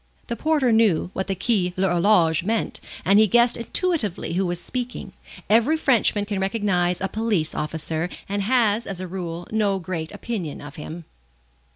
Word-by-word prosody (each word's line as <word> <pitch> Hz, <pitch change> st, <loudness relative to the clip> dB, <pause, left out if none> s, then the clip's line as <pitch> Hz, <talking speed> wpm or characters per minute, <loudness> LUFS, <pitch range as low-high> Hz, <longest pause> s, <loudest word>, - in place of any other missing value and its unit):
The 235 Hz, -, -3 dB
porter 295 Hz, -1 st, +2 dB
knew 220 Hz, -6 st, +3 dB
what 190 Hz, -, -3 dB
the 195 Hz, -, -1 dB
Quai 190 Hz, -2 st, +1 dB
l'Horloge 175 Hz, -3 st, +3 dB
meant, 220 Hz, +3 st, -1 dB, 0.3 s
and 200 Hz, +2 st, +5 dB
he 215 Hz, -, +6 dB
guessed 240 Hz, +3 st, +4 dB
intuitively 235 Hz, -, -1 dB
who 185 Hz, +1 st, +1 dB
was 175 Hz, 0 st, -3 dB
speaking. 250 Hz, +5 st, -5 dB, 0.3 s
Every 235 Hz, +9 st, +4 dB
Frenchman 230 Hz, -8 st, +2 dB
can 205 Hz, -2 st, -3 dB
recognize 190 Hz, -3 st, 0 dB
a 195 Hz, -, 0 dB
police 210 Hz, -7 st, -1 dB
officer, 160 Hz, +2 st, -2 dB, 0.2 s
and 200 Hz, +1 st, -2 dB
has, 225 Hz, 0 st, +2 dB
as 190 Hz, -2 st, -5 dB
a 185 Hz, -, -4 dB
rule, 175 Hz, -2 st, -5 dB
no 210 Hz, -3 st, +1 dB
great 165 Hz, -3 st, -5 dB
opinion 190 Hz, -11 st, -5 dB
of 145 Hz, 0 st, -10 dB
him. 160 Hz, +2 st, -8 dB
195 Hz, 165 wpm, -23 LUFS, 175-225 Hz, 0.3 s, he